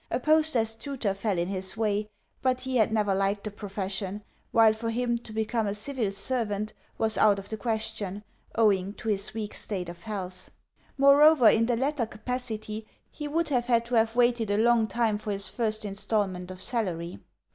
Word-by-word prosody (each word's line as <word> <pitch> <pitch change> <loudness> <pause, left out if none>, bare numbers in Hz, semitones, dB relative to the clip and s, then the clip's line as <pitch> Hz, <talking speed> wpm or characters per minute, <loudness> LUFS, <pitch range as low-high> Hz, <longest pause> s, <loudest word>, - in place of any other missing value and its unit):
A 240 - 0
post 310 0 +3
as 225 -1 +1
tutor 240 -4 -3
fell 195 -1 -1
in 170 +1 0
his 190 +1 -3
way, 210 -1 0 0.3
but 255 -1 +1
he 260 -1 -1
had 220 -1 +3
never 210 -3 +2
liked 195 +1 0
the 210 - -4
profession; 200 0 -4 0.3
while 225 -1 +6
for 230 +1 -4
him 240 +1 0
to 230 -1 -11
become 220 0 -1
a 200 - -2
civil 225 -1 -2
servant 215 -1 -1 0.2
was 220 -1 +1
out 210 -2 +5
of 195 0 -8
the 220 - -4
question, 210 -2 -3 0.3
owing 200 -3 +3
to 225 - -5
his 205 +1 -1
weak 215 -2 -4
state 185 -5 -4
of 175 - -10
health. 185 -4 -6 0.5
Moreover, 280 -1 +7
in 230 +1 +3
the 240 -1 +1
latter 270 -2 0
capacity 220 -2 -5 0.2
he 295 - -6
would 320 +2 0
have 250 -4 +1
had 235 -2 +2
to 245 - -8
have 225 0 +3
waited 240 -3 +2
a 205 - +1
long 230 0 +4
time 220 -2 0
for 215 - -6
his 200 0 +1
first 220 -2 -2
instalment 195 -2 -2
of 185 0 -8
salary. 180 -6 -2
220 Hz, 190 wpm, -28 LUFS, 200-240 Hz, 0.5 s, Moreover